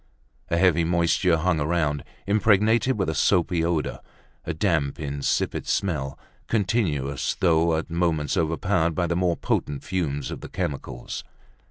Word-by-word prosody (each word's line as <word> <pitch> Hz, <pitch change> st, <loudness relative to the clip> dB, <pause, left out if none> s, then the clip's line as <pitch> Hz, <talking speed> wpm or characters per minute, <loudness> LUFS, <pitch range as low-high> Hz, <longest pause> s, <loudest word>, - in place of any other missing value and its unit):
A 85 Hz, -, +1 dB
heavy 85 Hz, -2 st, +4 dB
moisture 85 Hz, 0 st, +2 dB
hung 85 Hz, 0 st, +1 dB
around, 75 Hz, -2 st, 0 dB, 0.2 s
impregnated 110 Hz, +4 st, +3 dB
with 95 Hz, -, 0 dB
a 80 Hz, -, 0 dB
soapy 85 Hz, -1 st, +2 dB
odor, 85 Hz, -2 st, -1 dB, 0.5 s
a -, -, -2 dB
damp 80 Hz, -5 st, 0 dB
insipid 70 Hz, -2 st, -1 dB
smell, 75 Hz, -8 st, -1 dB, 0.3 s
continuous 85 Hz, -, 0 dB
though 80 Hz, -2 st, +3 dB
at 80 Hz, +1 st, -5 dB
moments 85 Hz, -3 st, 0 dB
overpowered 80 Hz, -1 st, +1 dB
by 90 Hz, -, +1 dB
the 85 Hz, 0 st, -1 dB
more 90 Hz, -1 st, +1 dB
potent 70 Hz, -1 st, -2 dB
fumes 75 Hz, -7 st, -2 dB
of -, -, -6 dB
the -, -, -8 dB
chemicals. 65 Hz, -3 st, -4 dB
85 Hz, 140 wpm, -25 LUFS, 75-90 Hz, 0.5 s, heavy